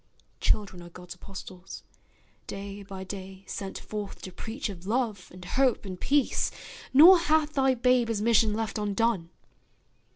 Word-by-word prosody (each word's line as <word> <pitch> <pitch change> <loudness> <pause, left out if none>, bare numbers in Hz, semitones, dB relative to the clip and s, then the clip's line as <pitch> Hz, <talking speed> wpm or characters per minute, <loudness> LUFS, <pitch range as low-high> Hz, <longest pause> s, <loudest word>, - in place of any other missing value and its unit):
Children 200 -4 0
are 175 - -11
God's 180 0 -10
apostles, 185 0 -10 0.6
day 200 0 -7
by 195 -1 -8
day 190 0 -8
Sent 195 0 -5
forth 210 -2 -6
to 185 - -7
preach 230 +8 -5
of 190 -3 -9
love, 220 -5 -1
and 180 0 -11
hope, 255 +2 +1
and 185 -2 -7
peace, 285 -1 +2 0.4
Nor 340 +7 +9
hath 310 -2 +2
thy 265 -2 +3
babe 250 0 +3
his 225 -2 -1
mission 225 0 +4
left 220 0 -2
undone. 205 -3 0
210 Hz, 150 wpm, -28 LUFS, 190-245 Hz, 0.6 s, Nor